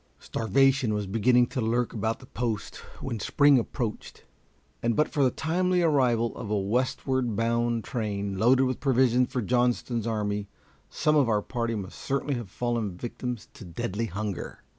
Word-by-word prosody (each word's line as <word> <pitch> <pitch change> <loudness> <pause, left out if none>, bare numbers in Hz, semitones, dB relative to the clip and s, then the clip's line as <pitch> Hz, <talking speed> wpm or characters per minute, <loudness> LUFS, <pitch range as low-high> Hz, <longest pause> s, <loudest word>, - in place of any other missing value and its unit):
Starvation 135 0 +2
was 105 -1 -2
beginning 120 +5 +3
to 130 +1 -4
lurk 115 +2 0
about 110 0 -1
the - - -14
post 115 -4 -3 0.2
when 115 - -3
spring 140 +5 +4
approached, 115 -1 -5 0.6
and 115 -1 +1
but 150 - +3
for 145 - 0
the 130 - +5
timely 180 +5 +1
arrival 125 -7 +2
of 110 - -6
a 105 - +1
westward 125 +3 0
bound 115 +1 0
train 100 -4 -3
loaded 125 +6 +4
with 130 -1 -1
provisions 125 -2 +3
for 125 -3 -1
Johnston's 120 -1 0
army, 105 -2 -2 0.4
some 155 - +1
of 140 -5 +4
our 105 -2 +1
party 115 -2 -2
must 100 -3 -6
certainly 140 +1 -1
have 120 -6 -4
fallen 115 -4 -2
victims 120 +1 -5
to - - -11
deadly 105 +4 -3
hunger. 100 +1 -5
120 Hz, 160 wpm, -27 LUFS, 110-130 Hz, 0.6 s, the